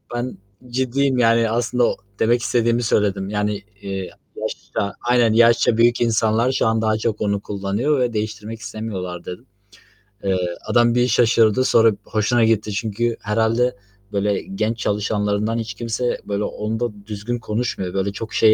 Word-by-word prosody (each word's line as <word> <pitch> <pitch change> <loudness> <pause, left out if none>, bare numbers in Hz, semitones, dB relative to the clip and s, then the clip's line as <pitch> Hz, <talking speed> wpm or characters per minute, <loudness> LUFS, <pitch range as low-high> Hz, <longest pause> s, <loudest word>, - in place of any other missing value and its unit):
ben 120 +1 -3 0.3
ciddiyim." 130 +2 +1
Yani, 115 -1 +4
aslında 120 +2 +1
o - - -1 0.2
demek 120 +2 +3
istediğimi 120 0 +1
söyledim 100 -3 +1
yani, 105 -1 -1 0.2
eee, 95 -2 -4 0.3
yaşça 100 -1 -3
aynen, 120 -2 +3
"Yaşça 115 0 +4
büyük 120 +1 +4
insanlar 115 +1 +2
şu 130 - +1
an 110 0 +1
daha 110 -1 +1
çok 110 -1 -2
onu 100 -1 +1
kullanıyor 105 +9 -1
ve 120 -2 0
değiştirmek 110 +1 -4
istemiyorlar." 95 -4 -6
dedim. 90 - -8 0.8
Eee, 95 -1 +1 0.3
adam 120 0 +3
bir 125 0 +3
şaşırdı, 115 0 +4
sonra 115 -2 +5
b - - -11
hoşuna 110 +2 +1
gitti. 110 -1 +2
Çünkü 115 +2 -1
herhâlde, 115 +3 +1 0.4
böyle, 100 0 0
genç 120 - -2
çalışanlarından 105 +1 0
hiç 115 -1 -4
kimse, 120 +3 -2
böyle, 100 0 -2
onda 105 -1 -3
düzgün 110 +3 -4
konuşmuyor. 110 -5 -3
Böyle, 95 +1 0
çok 110 +2 -7
şey 110 -1 +5
110 Hz, 150 wpm, -21 LUFS, 105-120 Hz, 0.8 s, sonra